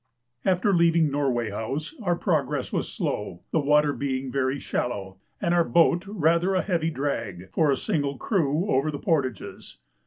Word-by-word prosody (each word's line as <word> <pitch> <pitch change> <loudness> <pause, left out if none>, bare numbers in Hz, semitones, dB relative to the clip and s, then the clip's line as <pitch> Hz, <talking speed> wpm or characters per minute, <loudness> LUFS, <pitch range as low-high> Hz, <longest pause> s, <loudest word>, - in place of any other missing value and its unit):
After 190 +2 +2
leaving 170 -3 +3
Norway 125 -6 0
House 135 - -4
our 175 -4 +1
progress 150 -7 -1
was - - -1
slow, 85 - -3
the 160 - +2
water 150 0 +3
being 130 -2 -3
very 135 0 0
shallow, 95 -8 -3 0.2
and 170 - 0
our 175 -1 +4
boat 170 +6 +3
rather 175 -1 +2
a 185 - +2
heavy 170 -4 0
drag, 110 - -4
for 155 +5 +2
a 135 - +2
single 140 -3 -1
crew, 165 - 0
over 135 +4 +2
the 145 - -3
portages. 140 - -2
145 Hz, 160 wpm, -25 LUFS, 130-170 Hz, 0.2 s, our